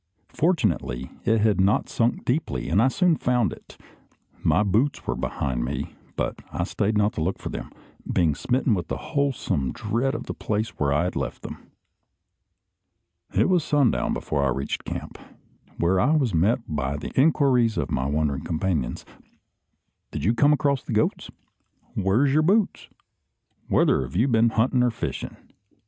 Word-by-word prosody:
Fortunately, 85 - 0
it 110 -1 +3
had 105 -3 +3
not 100 +2 +2
sunk 115 +1 0
deeply, 95 - -1
and 95 +6 +3
I 125 - +5
soon 175 +3 +2
found 125 -3 +1
it. - - -15 0.6
My 105 - +3
boots 110 +8 +1
were - - -1
behind 65 -3 -2
me, - - -4 0.2
but - - -3
I - - -2
stayed 105 +1 0
not 105 0 +2
to - - -3
look 90 +5 -1
for - - -6
them, - - -6 0.4
being 85 -4 +2
smitten 125 - 0
with 85 -5 -3
a - - -1 0.2
wholesome 135 - 0
dread 120 +6 -1
of - - -4
the - - -5
place 110 +1 -2
where 70 -1 +1
I 75 +4 +2
had 90 - -2
left 65 -3 -4
them. - - -9 1.7
It - - +4
was 180 -4 +2
sundown 145 -5 +2
before 70 -2 -1
I 70 - +2
reached 65 +2 -3
camp, - - -6 0.6
where 90 +3 +2
I 145 +10 +3
was 130 -9 +1
met 100 +10 +2
by 70 -2 -2
the - - -6
inquiries 130 -5 +3
of - - -2
my 65 +2 0
wondering 75 -1 -1
companions. 80 -6 -2 1.0
"Did 75 - -5
you 105 +7 +3
come 145 +5 +4
across 140 -2 +2
the - - -6
`goats'?" 110 +1 0 0.6
"Where's 110 +9 +2
your 155 - +4
boots?" 200 +6 +1 0.8
"Whether - - +3
have 65 +3 -6
you 115 +8 +3
been 115 -2 +4
hunting 120 +3 +2
or 125 - +3
fishing?" 85 - -5
110 Hz, 165 wpm, -24 LUFS, -, 1.7 s, I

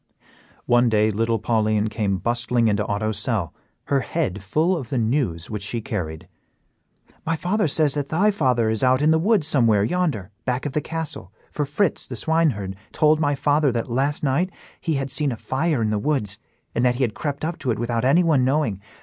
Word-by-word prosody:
One 120 0 +4
day 110 0 +3
little 115 +2 0
Pauline 110 -1 +1
came 105 -3 -1
bustling 120 +2 0
into 105 -1 +1
Otto's 105 +1 -1
cell, 105 -10 -1 0.3
her 140 - +1
head 130 - -2
full 155 - +1
of 135 -9 -5
the 135 - -1
news 110 - 0
which 105 -2 -5
she 110 +4 -3
carried. 90 -6 -5 1.0
"My 165 - 0
father 180 +4 0
says 150 -1 +2
that 145 -1 -2
thy 195 +8 +2
father 125 - +1
is 110 +1 -1
out 130 +2 +3
in 155 - +5
the 160 - +3
woods 200 -2 +2
somewhere 115 -9 +3
yonder, 125 - -1
back 125 +1 -2
of 145 - -3
the 150 - 0
castle, 160 - -5 0.2
for 145 -2 -2
Fritz, 160 +5 0
the 125 - -6
swineherd, 115 -8 0 0.2
told 155 0 +3
my 145 -2 +1
father 145 0 +2
that 115 0 -3
last 140 +5 0
night 150 +7 +1 0.3
he 160 -3 -1
had 135 -1 -2
seen 140 0 +1
a 120 - -4
fire 140 -1 -1
in 110 - 0
the 105 - 0
woods, 105 -7 -1 0.3
and 120 - 0
that 125 -1 +3
he 130 - 0
had 115 -4 0
crept 145 +3 -3
up 170 +1 -4
to 135 - -3
it 115 - +1
without 120 0 -1
anyone 150 0 +4
knowing. 130 -7 0
130 Hz, 200 wpm, -23 LUFS, 110-150 Hz, 1.0 s, in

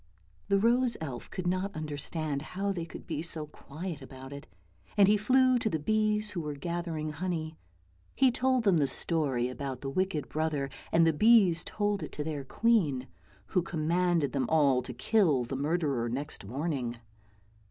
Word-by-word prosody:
The 200 - +3
rose 235 +3 +3
elf 135 -6 -6
could 185 - -5
not 185 +3 -1
understand 150 -1 -3 0.2
how 200 +1 0
they 170 -4 -3
could - - -10
be 155 -3 -3
so 160 -2 -3
quiet 155 +2 -7
about 135 0 -10
it, 140 - -9 0.5
and 200 -2 +7
he 210 - +5
flew 255 +4 +4
to 220 - 0
the 160 - 0
bees 215 +5 +1
who 175 - -3
were 150 -2 -4
gathering 165 0 -3
honey. 160 -1 -3 0.6
He 265 -1 +5
told 255 0 +1
them 195 -5 +4
the 145 -3 +3
story 135 -4 0
about 130 +1 -5
the 135 - -4
wicked 185 -2 -1
brother, 150 -3 -1 0.2
and 165 0 +5
the 165 - +4
bees 195 -2 +5
told 205 -1 -1
it - - -6
to 150 - -3
their 150 -2 -3
queen, 150 - +1 0.4
who 180 - +2
commanded 170 -1 +1
them 135 -3 -1
all 140 -5 +4
to 125 - -7
kill 155 - +3
the 130 +3 -4
murderer 140 -4 0
next 140 -1 -4
morning. 130 - -3
160 Hz, 175 wpm, -30 LUFS, 140-195 Hz, 0.6 s, and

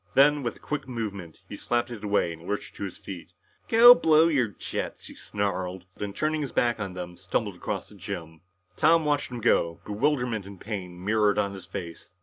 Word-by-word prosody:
Then, 145 +1 +6
with 120 - -3
a - - -17
quick 150 -3 -4
movement, 100 -9 -5
he - - -7
slapped 120 0 -1
it 110 -3 -7
away 100 -5 +1
and 85 +1 -12
lurched 105 - -4
to - - -5
his 95 - -7
feet. 90 -2 -9 0.4
"Go 235 +2 +10
blow 160 -9 +5
your 135 -7 +2
jets," 105 - -5
he - - -10
snarled, 95 -3 -3
and 100 -1 -5
turning 155 +3 0
his 140 - -3
back 120 -2 +1
on 100 -3 -4
them, 90 -1 -7
stumbled - - -2
across - - -4
the - - -14
gym. 85 -5 -7 0.3
Tom 165 - +4
watched 145 -1 +1
him 120 -2 -6
go, 85 -7 +2
bewilderment 120 -2 0
and 100 -2 -11
pain 90 -4 -6
mirrored 105 -1 +3
on 100 -1 0
his 95 -2 -9
face. 90 -2 -7
105 Hz, 200 wpm, -27 LUFS, 90-130 Hz, 0.4 s, Go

